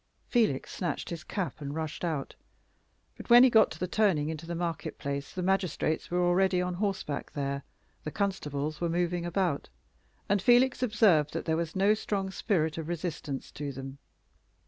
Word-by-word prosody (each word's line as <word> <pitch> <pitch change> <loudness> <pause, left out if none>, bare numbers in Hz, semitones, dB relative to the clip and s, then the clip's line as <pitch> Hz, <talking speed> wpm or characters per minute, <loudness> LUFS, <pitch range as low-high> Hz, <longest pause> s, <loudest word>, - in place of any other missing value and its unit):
Felix 220 - +1
snatched 175 - -3
his 165 -2 -5
cap 185 -6 -4
and 140 0 -4
rushed 160 0 -4
out. 155 -5 -2 0.8
But - - -11
when 240 +1 +9
he 260 - +6
got 220 -2 +6
to 160 - -9
the 180 - 0
turning 180 -6 +2
into 160 +1 -6
the 170 - -3
market 170 -1 -3
place 140 0 -4
the 180 - -4
magistrates 185 -4 0
were 180 0 +1
already 185 +1 +3
on 180 0 -1
horseback 190 -6 -3
there, 140 -1 -2 0.4
the - - -3
constables 155 -6 -2
were 170 - +1
moving 175 0 0
about, 175 -4 -1 0.6
and 200 -1 +2
Felix 250 +3 +4
observed 210 - +3
that - - -3
there 160 - +1
was 165 +1 -3
no 195 +2 +4
strong 195 -3 -2
spirit 165 -6 0
of 160 - -5
resistance 160 -5 -4
to 145 -1 -5
them. 135 +1 -8
175 Hz, 175 wpm, -29 LUFS, 150-195 Hz, 0.8 s, when